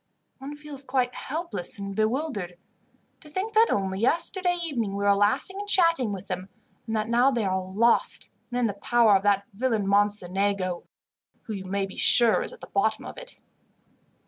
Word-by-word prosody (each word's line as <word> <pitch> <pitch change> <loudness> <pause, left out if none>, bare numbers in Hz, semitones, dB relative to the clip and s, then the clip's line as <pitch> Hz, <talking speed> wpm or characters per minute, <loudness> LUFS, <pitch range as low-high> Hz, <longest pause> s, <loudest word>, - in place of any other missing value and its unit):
"One 275 +2 -7
feels 295 -2 -7
quite 255 -2 -1
helpless 310 - -3
and 200 -1 -6
bewildered. 215 - -2 0.6
To 300 - -13
think 380 +8 -3
that 445 +1 +5
only 190 -1 -1
yesterday 355 - +1
evening 235 -11 -2
we 200 - -3
were 200 0 +5
laughing 205 - 0
and 410 0 -5
chatting 335 - +3
with 195 -1 -6
them, 185 +1 -5 0.4
and 225 - -2
that 215 0 -1
now 240 +3 +3
they 235 -5 -1
are 190 0 0
lost, 210 +6 +1 0.2
and 245 0 -2
in 245 - +2
the 210 - -1
power 225 +1 +3
of 190 - +3
that 200 -1 +2
villain 220 -1 -1
Mocenigo, 200 -2 0 0.6
who 220 - -6
you 190 -2 -6
may 195 +1 -1
be 195 - -11
sure 235 -3 +6
is - - -4
at - - -14
the - - -9
bottom 215 +2 0
of - - -8
it. - - -11
220 Hz, 185 wpm, -26 LUFS, 200-275 Hz, 0.6 s, sure